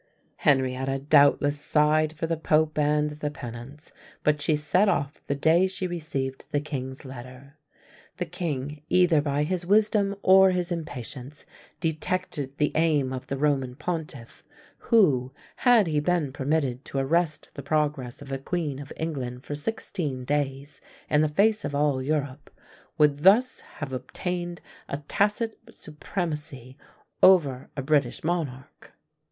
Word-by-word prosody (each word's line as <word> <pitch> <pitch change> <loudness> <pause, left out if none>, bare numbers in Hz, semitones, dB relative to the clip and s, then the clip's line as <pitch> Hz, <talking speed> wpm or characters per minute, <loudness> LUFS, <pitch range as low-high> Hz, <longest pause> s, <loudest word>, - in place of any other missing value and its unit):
Henrietta 130 -1 +1
doubtless 145 0 +4
sighed 155 +1 +2
for 160 +1 -3
the 165 0 0
Pope 155 -1 +1
and 150 0 +2
the 150 0 -4
penance, 125 +2 -9 0.3
but 150 -1 +2
she 155 +1 +2
set 180 +7 +2
off 145 -6 -1
the 140 - 0
day 165 +6 +4
she 190 0 -3
received 150 -7 -4
the 145 - 0
king's 130 -2 -6
letter. 130 +3 -11 0.6
The 180 - -2
king, 150 -5 -4
either 180 -4 +4
by 145 0 0
his 180 +3 -1
wisdom 205 +1 +3
or 190 0 +7
his 180 -1 -1
impatience, 145 -3 -6 0.3
detected 155 -3 -2
the 150 - +1
aim 150 -5 +2
of 130 - -6
the 135 - -3
Roman 135 -3 0
pontiff, 155 -6 -6 0.4
who, 140 - +3 0.3
had 245 -5 +5
he 155 -3 0
been 150 -3 0
permitted 140 -2 -1
to - - -5
arrest 155 +3 0
the 140 - -7
progress 145 -3 -1
of 140 - -10
a 135 - -2
Queen 150 -2 -3
of 145 0 -9
England 130 -6 -4
for - - -5
sixteen 145 - -3
days 140 0 -2 0.3
in 150 - +4
the 155 - +3
face 205 +8 +2
of 145 -1 -3
all 145 -2 +1
Europe, 145 0 -2 0.5
would 150 -2 +3
thus 205 +10 +4
have 145 -4 -6
obtained 175 +6 -4 0.3
a 140 - -2
tacit 210 +2 0
supremacy 150 -5 -5 0.5
over 145 -9 +5
a 135 - -2
British 140 -3 +1
monarch. 150 -6 -4
150 Hz, 145 wpm, -26 LUFS, 135-170 Hz, 0.6 s, or